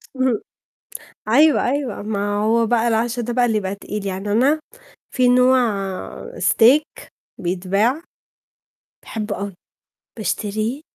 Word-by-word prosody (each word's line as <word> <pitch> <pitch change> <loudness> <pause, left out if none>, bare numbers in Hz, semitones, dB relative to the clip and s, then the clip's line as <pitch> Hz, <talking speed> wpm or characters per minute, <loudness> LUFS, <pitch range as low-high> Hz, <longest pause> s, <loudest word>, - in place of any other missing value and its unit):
اهم. 260 -4 +1 0.9
أيوه، 295 +6 +4
أيوه، 270 -7 -3
ما 205 -1 -2
هو 225 +2 +2
بقى 235 +1 +2
العَشا 235 +2 0
ده 240 +1 -3
بقى 245 0 +2
اللي 225 -3 +1
يبقى 195 -1 -3
تقيل، 200 0 -6
يعني 195 +2 -3
أنا 275 +8 +3 0.5
في 250 -1 +2
نوع 255 +1 +5 0.8
Steak 270 +7 +3 0.3
بيتباع، 195 - 0 1.0
باحبه 215 -2 -4
أوي، 200 -1 -5 0.6
باشتريه، 215 - -2
225 Hz, 115 wpm, -20 LUFS, 205-250 Hz, 1.0 s, نوع